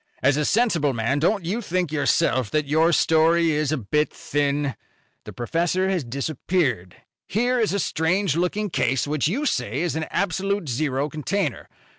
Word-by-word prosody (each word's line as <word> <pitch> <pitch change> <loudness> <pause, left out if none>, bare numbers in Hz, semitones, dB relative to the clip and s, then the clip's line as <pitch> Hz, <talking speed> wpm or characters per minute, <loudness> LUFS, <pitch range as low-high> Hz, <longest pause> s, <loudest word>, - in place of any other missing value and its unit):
"As 140 +1 +4
a 150 0 0
sensible 170 - +2
man, 120 +5 0
don't 175 +4 +1
you 205 +8 -2
think 180 -5 -1
yourself 145 -5 +1
that 150 +3 0
your 160 +4 +3
story 165 0 +3
is 150 -1 0
a 155 - 0
bit 150 +6 0
thin? 145 -1 -1 0.5
The - - -8
professor 170 +9 0
has 180 -5 0
disappeared. 130 - -2 0.3
Here 245 +5 +1
is 220 - +1
a 200 - 0
strange 170 +1 0
looking 185 +4 -1
case 130 -3 +1
which 150 -1 0
you 260 - -1
say 125 - -1
is 175 -2 -1
an 160 0 -2
absolute 195 -1 -1
zero 135 +2 -1
container. 155 +1 -3
160 Hz, 165 wpm, -23 LUFS, 140-185 Hz, 0.5 s, As